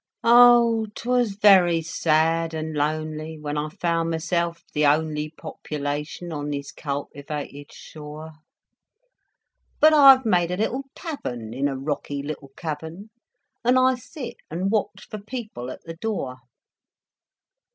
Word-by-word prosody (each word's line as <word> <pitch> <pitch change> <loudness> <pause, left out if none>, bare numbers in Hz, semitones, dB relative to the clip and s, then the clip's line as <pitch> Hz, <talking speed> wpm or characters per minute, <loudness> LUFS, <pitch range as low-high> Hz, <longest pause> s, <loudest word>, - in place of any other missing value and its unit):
Oh 235 -1 +6
I - - -14
'twas 245 -4 0
very 185 -5 +5
sad 165 0 +1
and 160 0 -4
lonely 155 +1 -2
When 150 -1 -5
I 150 +1 -2
found 165 +1 -1
myself 170 +1 -1
the 150 - +1
only 150 +1 +1
Population 150 +1 -5
on 145 -1 -4
this 140 -1 -4
cultivated 145 0 -6
shore; 155 +1 -10 1.5
But 310 +1 +7
I've 270 -3 +8
made 175 -5 +2
a 180 - -2
little 255 +6 -1
tavern 120 - -6
In 135 +3 0
a 135 -2 -3
rocky 140 0 -3
little 145 -2 -6
cavern. 165 +6 -6 0.5
And 250 +2 +4
I 255 0 +4
sit 250 +2 -8
and 180 +5 -2
watch 215 -2 -1
for 215 - -7
people 210 - -7
at - - -9
the 165 0 -9
door. 175 - -3
165 Hz, 130 wpm, -24 LUFS, 150-215 Hz, 1.5 s, I've